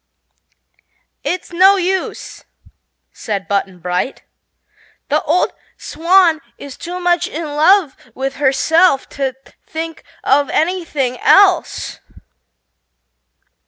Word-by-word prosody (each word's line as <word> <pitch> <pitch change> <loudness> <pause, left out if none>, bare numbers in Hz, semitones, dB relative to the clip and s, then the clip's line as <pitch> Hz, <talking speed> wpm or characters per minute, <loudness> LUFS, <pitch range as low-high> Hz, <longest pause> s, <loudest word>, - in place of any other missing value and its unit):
"It's 360 0 -3
no 380 +3 +6
use," 375 0 -3 0.7
said 200 -3 -4
Button 195 -2 -2
Bright; 180 +9 -3 0.9
"the 300 +1 +2
old 335 +5 0 0.2
Swan 335 -1 +2 0.2
is 280 -2 -10
too 355 +1 -6
much 350 -1 +1
in 330 - -5
love 310 +2 +3 0.2
with 270 +1 -4
herself 290 +3 +2
to 270 -2 -3 0.3
think 325 0 -6 0.2
of 280 0 +2
anything 310 -7 -1
else." 390 -2 +3
315 Hz, 90 wpm, -17 LUFS, 270-360 Hz, 0.9 s, no